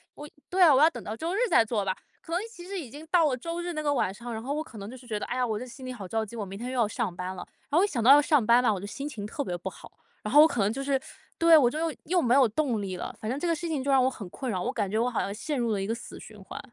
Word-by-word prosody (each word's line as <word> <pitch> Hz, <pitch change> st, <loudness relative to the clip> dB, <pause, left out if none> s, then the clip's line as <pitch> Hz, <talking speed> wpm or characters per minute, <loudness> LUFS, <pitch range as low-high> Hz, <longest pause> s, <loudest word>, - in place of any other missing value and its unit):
我 295 Hz, 0 st, -9 dB, 0.2 s
对 370 Hz, +1 st, 0 dB
啊， 320 Hz, -5 st, +8 dB
我 265 Hz, -, +5 dB
要 315 Hz, -, +7 dB
等 -, -, -8 dB
到 215 Hz, -, -5 dB
周 330 Hz, +7 st, -3 dB
日 -, -, -1 dB
再 -, -, +5 dB
做 215 Hz, -3 st, -2 dB
吧， 190 Hz, -, -1 dB, 0.3 s
可 330 Hz, -, -8 dB
能 355 Hz, -, +1 dB
其 350 Hz, -2 st, -11 dB
实 395 Hz, 0 st, -4 dB
已 280 Hz, -9 st, -6 dB
经 300 Hz, +5 st, -11 dB
到 335 Hz, -2 st, +4 dB
了 255 Hz, -, -1 dB
周 335 Hz, +6 st, -4 dB
日 350 Hz, 0 st, -3 dB
那 305 Hz, -, -3 dB
个 290 Hz, -1 st, +1 dB
晚 195 Hz, -7 st, 0 dB
上， 235 Hz, +2 st, -7 dB
然 220 Hz, +1 st, -5 dB
后 280 Hz, +3 st, -2 dB
我 305 Hz, -, -1 dB
可 230 Hz, -, -13 dB
能 200 Hz, +2 st, -7 dB
就 260 Hz, -, -9 dB
是 245 Hz, -1 st, -15 dB
觉 215 Hz, -3 st, -2 dB
得， -, -, -4 dB
哎 250 Hz, -, -3 dB
呀， 250 Hz, -1 st, +1 dB
我 215 Hz, -1 st, -1 dB
这 250 Hz, -, -6 dB
心 255 Hz, +1 st, -11 dB
里 255 Hz, -, -5 dB
好 205 Hz, -6 st, -8 dB
着 220 Hz, +2 st, -1 dB
急， 235 Hz, -, -11 dB
我 215 Hz, -, -3 dB
明 195 Hz, +2 st, -8 dB
天 245 Hz, +2 st, -4 dB
又 -, -, -4 dB
要 230 Hz, -, +4 dB
上 180 Hz, -4 st, -3 dB
班 180 Hz, 0 st, -4 dB
了， 185 Hz, -, -7 dB, 0.2 s
然 -, -, -44 dB
后 320 Hz, -, +4 dB
我 395 Hz, -, +5 dB
一 -, -, -1 dB
想 235 Hz, -, -2 dB
到 260 Hz, -, +8 dB
要 290 Hz, +1 st, +9 dB
上 290 Hz, -6 st, +3 dB
班 235 Hz, +2 st, +6 dB
嘛， 230 Hz, -4 st, +3 dB
我 190 Hz, -, -4 dB
就 -, -, -6 dB
心 275 Hz, +8 st, -5 dB
情 215 Hz, -8 st, -6 dB
特 280 Hz, +7 st, -4 dB
别 175 Hz, -, -3 dB
不 190 Hz, +2 st, -5 dB
好， -, -, -13 dB, 0.3 s
然 210 Hz, -, -4 dB
后 295 Hz, -, +9 dB
我 315 Hz, -, +8 dB
可 240 Hz, -, -4 dB
能 205 Hz, -, +1 dB
就 275 Hz, -, -4 dB
是 275 Hz, -1 st, +1 dB, 0.4 s
对， 330 Hz, -1 st, +7 dB
我 250 Hz, -5 st, +5 dB
就 300 Hz, -, -5 dB
又 325 Hz, -2 st, -2 dB
又 355 Hz, +2 st, +2 dB
没 245 Hz, 0 st, +2 dB
有 265 Hz, -4 st, +6 dB
动 235 Hz, -3 st, 0 dB
力 185 Hz, -2 st, -4 dB
了， -, -, -6 dB
反 215 Hz, -, -4 dB
正 265 Hz, +3 st, -2 dB
这 350 Hz, -, -2 dB
个 335 Hz, -, +2 dB
事 335 Hz, +2 st, -5 dB
情 295 Hz, -5 st, -2 dB
就 280 Hz, -, 0 dB
让 265 Hz, -2 st, +5 dB
我 260 Hz, -, +3 dB
很 210 Hz, -7 st, -8 dB
困 255 Hz, +2 st, -4 dB
扰， 185 Hz, -2 st, -2 dB
我 -, -, -1 dB
感 205 Hz, -5 st, -2 dB
觉 215 Hz, -, -1 dB
我 245 Hz, +2 st, +2 dB
好 235 Hz, -, -2 dB
像 200 Hz, -, -3 dB
陷 265 Hz, +5 st, -3 dB
入 235 Hz, -2 st, 0 dB
了 200 Hz, -2 st, 0 dB
一 -, -, -2 dB
个 225 Hz, -, 0 dB
死 230 Hz, -, -9 dB
循 210 Hz, -2 st, -13 dB
环。 190 Hz, -, -8 dB
250 Hz, 405 characters per minute, -27 LUFS, 215-300 Hz, 0.4 s, 要